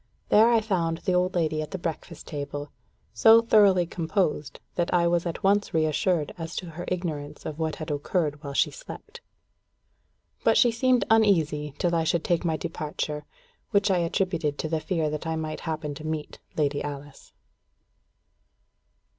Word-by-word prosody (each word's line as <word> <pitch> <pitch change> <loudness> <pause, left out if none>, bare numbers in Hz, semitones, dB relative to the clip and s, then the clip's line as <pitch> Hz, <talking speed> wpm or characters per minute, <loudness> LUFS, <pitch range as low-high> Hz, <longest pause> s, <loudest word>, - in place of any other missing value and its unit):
There 220 +3 +6
I 230 -2 +4
found 170 -6 0
the 185 - -1
old 180 +1 +1
lady 155 -3 +1
at 155 - -5
the - - -4
breakfast 170 -1 -6
table, 145 0 -5 0.4
so 225 +1 +7
thoroughly 205 -6 +5
composed, 165 -4 -1
that 175 -1 -1
I 175 -1 +3
was 170 0 +1
at 170 - -5
once 200 -1 +2
reassured 155 +1 +1
as 165 +1 -5
to 180 -3 -5
her 175 +2 -7
ignorance 160 -5 -4
of 155 0 -5
what 160 -1 -1
had 155 -1 -5
occurred 145 0 -1
while 140 -1 -6
she - - +3
slept. 480 -2 -10 1.2
But - - +4
she 240 - +5
seemed 250 +2 +2
uneasy 160 -10 +3
till 175 -1 0
I 165 -1 +2
should 165 +1 +1
take 175 0 +1
my 160 -2 0
departure, 150 -1 -4 0.4
which 200 -2 +2
I 185 - +3
attributed 170 -3 -1
to 155 - -3
the 160 0 0
fear 160 -1 -1
that 150 +1 -4
I 160 - -1
might 155 -1 -4
happen 155 -2 -3
to 150 - -9
meet 155 -1 -4 0.2
Lady 145 -2 +1
Alice. 145 -1 -8
165 Hz, 170 wpm, -26 LUFS, 150-185 Hz, 1.2 s, so